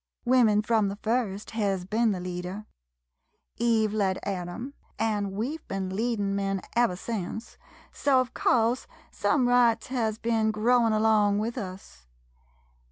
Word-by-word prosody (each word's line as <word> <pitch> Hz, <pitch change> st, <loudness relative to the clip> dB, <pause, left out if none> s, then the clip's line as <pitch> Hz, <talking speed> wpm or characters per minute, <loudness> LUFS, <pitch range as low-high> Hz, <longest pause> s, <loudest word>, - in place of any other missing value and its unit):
Women 235 Hz, -4 st, +4 dB
frum 220 Hz, -1 st, +2 dB
the 200 Hz, -, -4 dB
first 215 Hz, -2 st, -2 dB
hez 200 Hz, -5 st, -1 dB
ben 225 Hz, +4 st, +1 dB
the 195 Hz, -3 st, -1 dB
leader 180 Hz, +3 st, -5 dB, 0.5 s
— 65 Hz, +2 st, -49 dB
Eve 225 Hz, -2 st, +2 dB
led 195 Hz, -3 st, +1 dB
Adam, 195 Hz, +7 st, -4 dB, 0.2 s
an' 210 Hz, -3 st, 0 dB
we 225 Hz, +11 st, -3 dB
've -, -, -32 dB
ben 190 Hz, -1 st, -3 dB
leadin' 210 Hz, -3 st, -1 dB
men 195 Hz, -1 st, -1 dB
ever 235 Hz, -6 st, +3 dB
sence, 220 Hz, +2 st, -5 dB, 0.4 s
so 275 Hz, -2 st, +2 dB
of 255 Hz, -1 st, -2 dB
course 235 Hz, +1 st, +1 dB, 0.2 s
some 260 Hz, -4 st, +1 dB
rights 245 Hz, -2 st, +3 dB
hez 225 Hz, -4 st, -1 dB
ben 225 Hz, -1 st, +1 dB
growin' 230 Hz, +2 st, +3 dB
along 215 Hz, -2 st, +3 dB
with 225 Hz, +3 st, -2 dB
us. 185 Hz, -, -8 dB
215 Hz, 145 wpm, -27 LUFS, 195-235 Hz, 0.5 s, Women